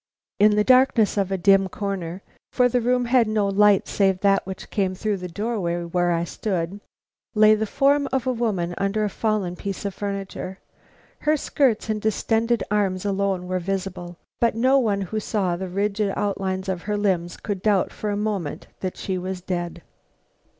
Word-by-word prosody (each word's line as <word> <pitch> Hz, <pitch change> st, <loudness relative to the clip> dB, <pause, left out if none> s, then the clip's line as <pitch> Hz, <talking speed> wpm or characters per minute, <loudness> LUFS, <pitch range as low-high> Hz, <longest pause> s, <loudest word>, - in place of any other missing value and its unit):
In 210 Hz, 0 st, +5 dB
the 210 Hz, -, +3 dB
darkness 255 Hz, -3 st, +4 dB
of 195 Hz, -2 st, 0 dB
a 195 Hz, -, 0 dB
dim 195 Hz, +1 st, +4 dB
corner 190 Hz, -2 st, -4 dB, 0.3 s
(for 250 Hz, -1 st, +4 dB
the 245 Hz, 0 st, +1 dB
room 250 Hz, +1 st, +1 dB
had 240 Hz, -1 st, +3 dB
no 215 Hz, -2 st, +1 dB
light 200 Hz, 0 st, +4 dB
save 195 Hz, -2 st, +1 dB
that 195 Hz, -1 st, +2 dB
which 190 Hz, -1 st, -8 dB
came 190 Hz, -3 st, 0 dB
through 210 Hz, +1 st, -1 dB
the 180 Hz, -1 st, -6 dB
doorway 180 Hz, -3 st, -2 dB
where 175 Hz, +1 st, 0 dB
I 170 Hz, 0 st, +1 dB
stood) 180 Hz, +1 st, -3 dB, 0.6 s
lay 215 Hz, 0 st, +7 dB
the 215 Hz, 0 st, 0 dB
form 280 Hz, +3 st, +2 dB
of 265 Hz, -2 st, 0 dB
a 255 Hz, -, +1 dB
woman 200 Hz, -8 st, -1 dB
under 195 Hz, +2 st, 0 dB
a 210 Hz, -, -1 dB
fallen 210 Hz, -5 st, -1 dB
piece 195 Hz, +2 st, -5 dB
of 200 Hz, -, -2 dB
furniture. 195 Hz, -1 st, -5 dB, 0.6 s
Her 305 Hz, +1 st, +2 dB
skirts 265 Hz, -7 st, +1 dB
and 215 Hz, -1 st, -1 dB
distended 225 Hz, +2 st, +1 dB
arms 195 Hz, -2 st, 0 dB
alone 195 Hz, -2 st, 0 dB
were 185 Hz, 0 st, -1 dB
visible; 180 Hz, -1 st, -4 dB, 0.2 s
but 235 Hz, -2 st, +2 dB
no 260 Hz, +4 st, +4 dB
one 205 Hz, -5 st, 0 dB
who 215 Hz, +3 st, -3 dB
saw 195 Hz, -5 st, -1 dB
the 185 Hz, +1 st, -5 dB
rigid 200 Hz, +2 st, 0 dB
outlines 190 Hz, -2 st, -2 dB
of 185 Hz, -2 st, -2 dB
her 210 Hz, -, +1 dB
limbs 180 Hz, -4 st, 0 dB
could 205 Hz, -4 st, -4 dB
doubt 205 Hz, -2 st, +2 dB
for 210 Hz, -, -4 dB
a 205 Hz, -, -1 dB
moment 205 Hz, -8 st, -3 dB
that 185 Hz, -1 st, -4 dB
she 185 Hz, -2 st, -3 dB
was 185 Hz, 0 st, -4 dB
dead. 175 Hz, -2 st, -4 dB
200 Hz, 185 wpm, -23 LUFS, 185-215 Hz, 0.6 s, lay